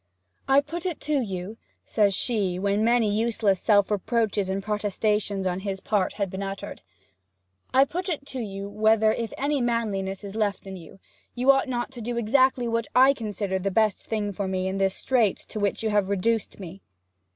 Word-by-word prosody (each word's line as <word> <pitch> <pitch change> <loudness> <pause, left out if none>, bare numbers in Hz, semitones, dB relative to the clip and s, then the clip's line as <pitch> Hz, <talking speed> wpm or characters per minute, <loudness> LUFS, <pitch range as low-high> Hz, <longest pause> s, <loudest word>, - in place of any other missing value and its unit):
'I 270 +1 +5
put 335 +5 -5
it 345 - -3
to 300 -1 0
you,' 195 0 -5 0.3
says 205 -3 +2
she, 200 -7 0
when 200 +2 0
many 235 -1 +3
useless 215 -3 +1
self 205 -1 +3
reproaches 210 -1 0
and 195 +1 -2
protestations 210 -1 -1
on 180 0 -1
his 195 -1 -4
part 200 -2 0
had 200 -2 -2
been 190 - -5
uttered 195 0 -6 0.9
'I 265 +1 +5
put 360 +6 -4
it 300 -5 -3
to 265 - -5
you 200 -3 -5
whether, 215 +1 +3
if 230 -1 -4
any 285 0 0
manliness 210 -5 -1
is 200 -1 -7
left 210 -3 -1
in 190 0 -7
you, 175 +1 -12 0.4
you 255 +2 +5
ought 270 0 +1
not 240 0 -2
to 245 -3 -9
do 235 +1 -3
exactly 250 +2 +2
what 230 -1 -1
I 260 +2 +7
consider 205 -5 -3
the 195 +2 -1
best 215 +1 +2
thing 210 -2 -3
for 195 +1 -3
me 185 0 -1
in 190 +1 -2
this 195 -1 +2
strait 235 -7 +1
to 215 - -5
which 205 +1 -1
you 220 - 0
have 205 -2 +1
reduced 210 +3 -1
me?' 190 0 -9
210 Hz, 195 wpm, -25 LUFS, 195-235 Hz, 0.9 s, I